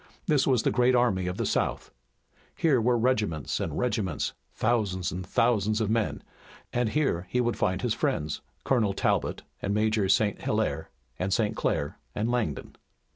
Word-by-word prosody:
This 150 -7 +2
was 125 -5 +3
the - - +2
great 125 +1 +3
army 105 -7 +2
of 90 +1 -3
the 115 - -1
South. - - -1 0.6
Here 140 -7 +3
were 120 +1 +3
regiments 105 - 0
and 80 -2 -3
regiments, 110 -10 -1 0.2
thousands 105 -6 0
and 90 +1 -4
thousands 110 +1 +2
of 110 -2 0
men 115 -1 0 0.5
and 120 -2 +1
here 110 - 0
he 125 - 0
would 120 -1 +1
find 90 +1 0
his 120 -3 +1
friends, 110 - -1 0.2
Colonel 110 -7 +2
Talbot - - 0 0.2
and 100 +1 -1
Major 110 -2 +2
St. 100 0 +2
Hilaire, - - -1 0.3
and 95 +1 -1
St. 105 +2 +1
Clair - - -1 0.2
and 110 +3 0
Langdon. 115 - -2
110 Hz, 165 wpm, -28 LUFS, 95-120 Hz, 0.6 s, was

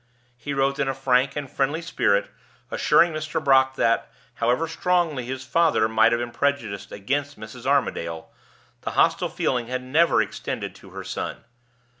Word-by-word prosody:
He 120 +4 -7
wrote 135 +1 +1
in 140 - +1
a 135 - -1
frank 130 0 +2
and 145 -2 -4
friendly 140 +4 -1
spirit, 100 -11 +1 0.4
assuring 170 -1 +4
Mr. 155 +1 -2
Brock 130 -1 +4
that, 115 -2 +1 0.2
however 125 +8 +1
strongly 165 -5 0
his 130 +1 -5
father 160 -8 +3
might 110 +1 +4
have 120 - +2
been 120 0 -4
prejudiced 120 -8 -2
against 140 +8 -3
Mrs. 115 +4 -9
Armadale, 85 - -1 0.5
the - - -4
hostile - - +3
feeling 120 -2 -1
had 130 +1 -3
never 155 +6 +3
extended - - -3
to - - -15
her - - -8
son. - - -5
130 Hz, 160 wpm, -24 LUFS, 120-145 Hz, 0.5 s, assuring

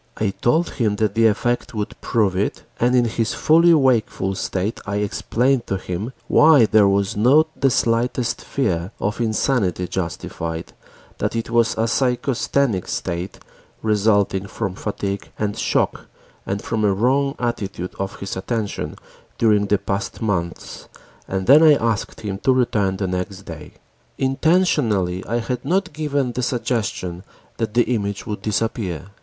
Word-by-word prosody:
I 105 -2 0
told 160 +8 +2
him 110 -7 0
that 105 -1 0
the 115 +1 +4
effect 120 +2 -1
would 105 -1 -4
prove 105 -6 +1
it 100 +3 -1 0.2
and 125 +2 +3
in 120 -1 +4
his 115 0 -1
fully 165 +2 +5
wakeful 120 -8 +1
state 95 +2 -2
I 105 - -2
explained 115 +5 0
to 95 - -1
him 95 +6 -4 0.2
why 150 -6 +6
there 105 -2 +4
was 100 0 +1
not 140 +9 +4
the 135 - +5
slightest 120 0 0
fear 90 -10 -1
of 105 +4 -2
insanity 110 -5 0
justified, 85 -2 -4 0.5
that - - -1
it 115 0 -3
was 115 -1 +3
a 110 - +2
psychasthenic 125 -3 0
state 85 +2 -4 0.4
resulting 100 -2 +2
from 100 -2 -3
fatigue 100 0 -4
and 105 -1 -2
shock - - 0 0.4
and 100 +1 -2
from 110 -2 -1
a 105 - +4
wrong 135 +6 +1
attitude 100 -7 -3
of 95 0 -3
his 100 - -4
attention 105 +2 -3 0.4
during 105 -3 +3
the 105 - +3
past 100 0 -4
months, 85 -7 -3 0.4
and 95 0 -2
then 145 +7 +7
I 155 -2 +7
asked 115 -5 -2
him 100 -3 -4
to 135 - +2
return 105 -6 +1
the 95 - -2
next 95 +1 -4
day. 80 -4 -9 0.4
Intentionally 130 - +1
I 115 - 0
had 120 +1 -3
not 180 +4 0
given 145 -4 -1
the 125 - -3
suggestion 110 -8 -2 0.3
that 115 -1 -3
the 120 - +5
image 100 -5 -2
would 105 -2 -5
disappear. 100 -5 -2
110 Hz, 150 wpm, -21 LUFS, 95-125 Hz, 0.5 s, then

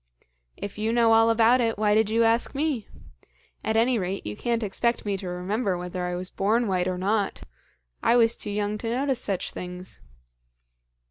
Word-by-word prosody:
"If 205 +1 -7
you 220 +1 0
know 230 -1 +4
all 225 0 +5
about 230 +2 +4
it, 225 -1 0
why 210 0 +2
did 215 0 +3
you 230 +1 +3
ask 230 +4 +2
me? 280 -6 -1 0.8
At 220 0 0
any 235 +1 +3
rate, 190 +1 -3
you 105 0 -4
can't 235 - -1
expect 235 +4 -1
me 200 -1 0
to 190 -1 -7
remember 185 +2 -1
whether 180 0 -4
I 180 0 -2
was 180 +1 -5
born 220 +4 +1
white 185 -2 0
or 185 -1 -2
not. 200 +2 -1 0.6
I 235 - +3
was 230 -1 +4
too 210 - -3
young 205 +1 -2
to 225 - -4
notice 265 +2 0
such 195 -3 -2
things." 180 0 -7
215 Hz, 190 wpm, -25 LUFS, 190-230 Hz, 0.8 s, all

